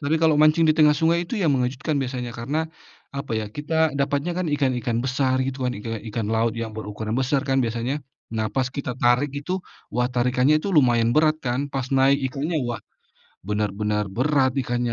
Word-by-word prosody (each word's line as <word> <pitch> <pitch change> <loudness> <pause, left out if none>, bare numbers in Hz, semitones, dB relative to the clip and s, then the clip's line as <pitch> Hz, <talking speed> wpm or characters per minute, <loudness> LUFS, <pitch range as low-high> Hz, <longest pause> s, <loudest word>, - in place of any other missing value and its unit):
Tapi, 155 +2 +1
kalau 160 -2 +4
mancing 155 +2 +5
di 155 - +4
tengah 150 -2 +6
sungai 165 +3 +2
itu 215 +3 -4
yang 155 -6 +3
mengejutkan, 130 +4 -1
biasanya. 125 -3 -3
Karena, 150 +7 -2 0.4
apa 140 -2 -6
ya, 110 -2 -1
kita 150 +4 0
dapatnya, 145 +5 -1
kan, 185 - -1
ikan-ikan 125 -5 0
besar, 130 0 +1
gitu, 130 0 -2
kan. 125 - 0
Ika 115 +2 -5 0.2
ikan 110 -3 -2
laut 115 +1 +1
yang 115 -1 -5
berukuran 110 +1 -4
besar, 135 +2 +1
kan, 135 -1 +2
biasanya. 120 +5 -2 0.3
Nah, 110 -1 -2
pas 130 -1 0
kita 135 -1 -4
tarik 125 +4 +3
itu, 145 +6 -3 0.3
wah, 125 - 0
tarikannya 125 +4 +3
itu 200 - -4
lumayan 120 -8 +3
berat, 155 0 +3
kan. 135 +3 -2
Pas 135 -2 -2
naik 135 +1 +3
ikannya, 150 +5 -2
wah. 120 -4 -3 0.6
Benar-benar 105 0 -2
berat, 130 +2 +2
ikannya, 120 -1 -1
130 Hz, 185 wpm, -23 LUFS, 120-150 Hz, 0.6 s, tengah